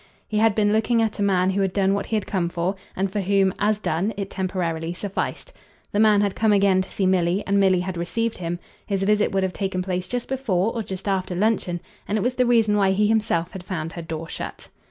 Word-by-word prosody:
He 215 - 0
had 220 -2 +4
been 210 -1 +3
looking 225 +2 +2
at 220 -1 -2
a - - 0
man 190 -2 +2
who 195 +1 0
had 190 -2 0
done 195 -1 +2
what 200 - -2
he 225 - -1
had 210 - -1
come 180 -4 -1
for, 175 +2 -1 0.2
and 190 0 -1
for 205 0 -1
whom, 195 0 +2
as 210 0 +2
done, 200 +2 -1
it 195 -1 -4
temporarily 175 -3 -2
sufficed. 195 +2 -4 0.4
The 205 - 0
man 210 -2 +5
had 200 -2 +1
come 220 -1 +2
again 195 -2 +4
to 185 - -6
see 195 - -1
Milly, 185 +1 +2
and 200 0 +2
Milly 190 -2 +4
had 185 -1 -4
received 230 +7 -1
him. 175 0 -3 0.3
His 195 -2 0
visit 210 +1 +2
would 195 0 +1
have 190 -1 -1
taken 190 -2 -2
place 180 -1 -2
just 245 +2 -3
before 225 -6 0
or 230 - -2
just 190 -1 -6
after 190 -2 -1
luncheon, 185 -3 0 0.3
and 210 - 0
it - - 0
was 245 +3 0
the 250 -1 +1
reason 225 -3 +4
why 195 -1 +3
he 210 +2 +2
himself 210 -6 +1
had 190 - -8
found 165 -4 -4
her 170 - -6
door 160 0 -5
shut. - - -7
195 Hz, 245 wpm, -23 LUFS, 185-210 Hz, 0.4 s, man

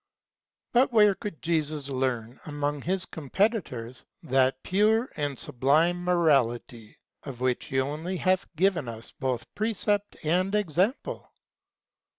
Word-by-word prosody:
But 250 +2 +4
where 210 -3 +6
could 200 -5 -7
Jesus 155 -3 -1
learn, 130 -3 -2
among 145 -1 -2
his 185 +3 -1
competitors, 150 - -2 0.2
that 130 0 +2
pure 220 +6 +2
and 145 -2 -2
sublime 155 +10 +2
morality, 130 -10 +1 0.2
of 130 -4 -8
which 125 -1 0
he 130 - -1
only 155 +7 -2
hath 185 +1 +1
given 180 -4 +2
us 115 0 -9
both 130 -4 -3
precept 205 -1 -1
and 185 +5 +1
example 200 - -1
155 Hz, 120 wpm, -27 LUFS, 130-190 Hz, 0.2 s, where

